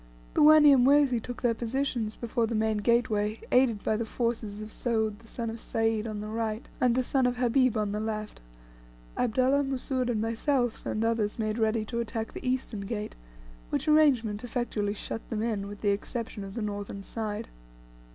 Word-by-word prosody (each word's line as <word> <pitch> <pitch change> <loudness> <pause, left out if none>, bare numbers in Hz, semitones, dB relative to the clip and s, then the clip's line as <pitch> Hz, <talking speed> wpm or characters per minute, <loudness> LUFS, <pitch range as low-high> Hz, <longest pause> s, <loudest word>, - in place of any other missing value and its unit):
The - - +2
Wanyamwezi 285 -4 +6
took 245 +3 -7
their 240 -1 +3
position 240 -1 -1
before 235 -1 0
the 230 - -2
main 220 0 +1
gateway, 215 -1 +1
aided 245 -5 +3
by 215 - +1
the 230 - -2
forces 225 -3 -2
of 215 - -9
Soud 220 -4 -1
the 230 - -17
son 230 0 -4
of 225 - -7
Sayd 225 0 0
on 210 -1 -4
the 210 - -5
right, 220 0 -3
and 245 -2 +4
the 255 - +2
son 260 0 +2
of 250 - 0
Habib 250 -1 +2
on 210 -1 0
the 210 - -2
left, 215 -1 -4 0.7
Abdullah, 255 +4 +2
Mussoud, 265 -1 -1
myself, 230 +3 0
and 215 - -1
others 225 -2 0
made 215 0 -1
ready 220 0 +1
to 235 +1 -3
attack 225 -1 -3
the - - -7
eastern 255 -4 -1
gates, 210 +1 -4 0.5
which - - -2
arrangement 255 -9 +3
effectually 225 -4 -2
shut 225 - -6
them 220 -1 -2
in, 210 -4 -1
with 205 0 -9
the 205 - +2
exception 215 +1 -4
of 195 0 -8
the 230 - -2
northern 205 -1 -5
side. 215 0 -4
225 Hz, 180 wpm, -28 LUFS, 215-245 Hz, 0.7 s, Wanyamwezi